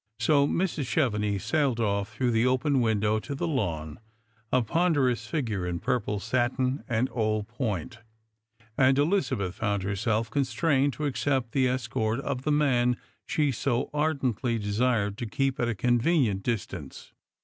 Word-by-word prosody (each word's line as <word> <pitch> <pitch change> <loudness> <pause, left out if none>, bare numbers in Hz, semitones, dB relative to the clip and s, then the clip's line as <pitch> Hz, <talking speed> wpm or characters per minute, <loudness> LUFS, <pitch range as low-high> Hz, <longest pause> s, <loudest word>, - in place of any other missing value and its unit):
So 145 -2 +3
Mrs. 165 -4 -1
Cheveiiix 105 -8 0
sailed 130 +1 +1
off 100 -2 0
through 125 -2 0
the 115 0 +2
open 130 +1 +2
window 110 -1 +1
to 140 +5 -6
the 140 - -2
lawn, 80 - -2 0.5
a 130 -1 +3
ponderous 130 -5 +1
figure 110 - -2
in 85 -1 -2
pur])le 110 -2 -1
satin 125 +4 0
and 120 +2 +1
old 110 -2 -1
point, 115 - -4 0.8
and 135 0 +4
Elizabeth 145 - +1
found 100 -3 -1
herself 105 +3 -1
constrained 140 0 +1
to 150 - -6
accejDt 135 -3 0
the 130 0 +2
escort 115 -2 -1
of 140 -2 -3
the 150 - -1
man 125 -5 +2 0.3
she 150 -2 +1
so 120 0 -1
ardently 135 -6 0
desired 105 0 0
to 120 - -3
keep 135 +4 -1
at 120 - +1
a 115 - -1
convenient 120 - +2
distance. 115 -2 -5
120 Hz, 150 wpm, -27 LUFS, 110-140 Hz, 0.8 s, and